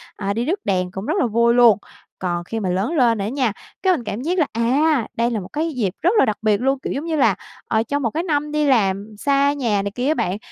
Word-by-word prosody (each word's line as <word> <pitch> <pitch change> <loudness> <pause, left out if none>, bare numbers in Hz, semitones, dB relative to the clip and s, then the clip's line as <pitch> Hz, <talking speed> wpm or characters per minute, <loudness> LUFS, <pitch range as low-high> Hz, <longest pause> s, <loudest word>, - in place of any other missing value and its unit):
à, 200 -1 -2
đi 230 +3 -2
rước 360 +8 -1
đèn 185 -2 0
cũng 190 +2 -6
rất 310 - 0
là - - +2
vui 235 +1 +2
luôn. 240 -4 +6 0.4
Còn 175 -2 -2
khi 225 +6 -4
mà 195 -4 -2
lớn 190 +6 0
lên 240 -7 +3
rồi 200 - -2
á - - -2
nha, 255 -3 0 0.3
cái 375 -1 +4
mình 265 - -3
cảm 215 +1 -4
giác 350 +6 -1
là, 305 - +2
à, 255 +3 +2
đây 235 +1 +1
là 225 - -1
một 180 - -8
cái 320 +2 -1
dịp 210 -8 -1
rất 345 - +3
là - - +5
đặc 215 - -1
biệt 215 -1 +2
luôn, 270 +1 +1
kiểu - - -4
giống 285 +4 -4
như 330 -1 -1
là, 290 - +3 0.3
ờ, 220 0 +1
trong 285 +5 -2
một 235 - +1
cái 330 - -2
năm 300 -3 -1
đi 300 0 +1
làm 210 -5 +1
xa 280 +4 +2
nhà 230 -8 0
này 200 0 -3
kia 250 +2 -1
á 305 - +3
bạn, 190 - -1
235 Hz, 285 wpm, -21 LUFS, 205-285 Hz, 0.4 s, luôn